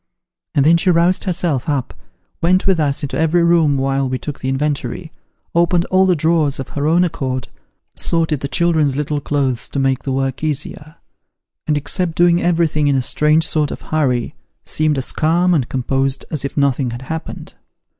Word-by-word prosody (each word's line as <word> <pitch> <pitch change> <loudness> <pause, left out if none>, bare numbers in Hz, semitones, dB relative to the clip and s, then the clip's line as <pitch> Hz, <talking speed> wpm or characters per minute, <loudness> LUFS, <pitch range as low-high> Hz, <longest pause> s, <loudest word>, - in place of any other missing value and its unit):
And 140 -2 +3
then 165 +2 +5
she 185 - +1
roused 175 +1 +2
herself 170 -6 -1
up, 140 -4 -2 0.5
went 185 +2 +2
with 190 -4 +2
us 145 -2 0
into 140 - -3
every 165 +2 +2
room 165 -4 +3
while 135 0 0
we 130 - -1
took 145 +2 -7
the 130 - -3
inventory, 150 +4 -2 0.4
opened 170 +1 +2
all 190 0 +4
the 180 - +3
drawers 160 -3 +1
of 135 - -6
her 145 +1 -2
own 170 +3 +4
accord, 130 -7 -3 0.5
sorted 160 -3 0
the 140 - -4
children's 160 -3 +1
little 150 0 -2
clothes 135 -4 -1
to - - -6
make 135 -1 +1
the 135 - -4
work 135 +1 -2
easier; 155 +1 -3 0.7
and, 150 -1 +1
except 165 +3 -1
doing 175 0 +3
everything 165 -4 +1
in 140 - +2
a 135 - +2
strange 155 +4 +3
sort 150 -3 +1
of - - -7
hurry, 130 -6 0 0.3
seemed 155 -2 0
as 130 - -1
calm 175 +3 +2
and 135 -7 0
composed 135 +1 -1
as 155 -4 -3
if 140 - -5
nothing 140 -2 +1
had 120 +2 -7
happened. 160 +4 -7
150 Hz, 185 wpm, -18 LUFS, 135-170 Hz, 0.7 s, then